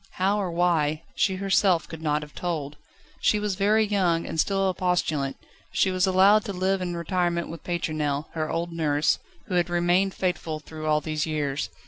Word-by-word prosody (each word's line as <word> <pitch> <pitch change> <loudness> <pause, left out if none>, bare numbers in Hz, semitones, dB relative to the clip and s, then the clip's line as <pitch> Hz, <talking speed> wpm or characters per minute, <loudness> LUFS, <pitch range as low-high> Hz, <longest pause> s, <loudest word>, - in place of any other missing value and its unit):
How 195 +3 +1
or 190 - -2
why, 165 -3 +1
she 190 - +1
herself 190 -2 +2
could 160 -1 -9
not 150 -1 0
have 150 - -12
told. 155 -5 -3 0.4
She 210 - +2
was 210 -1 -1
very 210 +3 +3
young, 180 -5 +1
and 160 - -4
still 195 +3 +2
a 190 - +1
postulant; 160 -6 0 0.3
she 190 - +2
was 185 +1 +2
allowed 195 +3 +5
to 200 - -4
live 190 +1 0
in 175 -1 -3
retirement 170 0 -1
with 165 - -8
Pétronelle, 155 -4 -1
her 155 -1 -3
old 170 +1 -2
nurse, 150 -2 +1 0.3
who - - -6
had 175 -1 +2
remained 175 +2 +2
faithful 170 -4 -2
through 155 0 -7
all 150 0 +3
these 155 +1 -2
years. 150 -2 -2
175 Hz, 185 wpm, -26 LUFS, 155-190 Hz, 0.4 s, allowed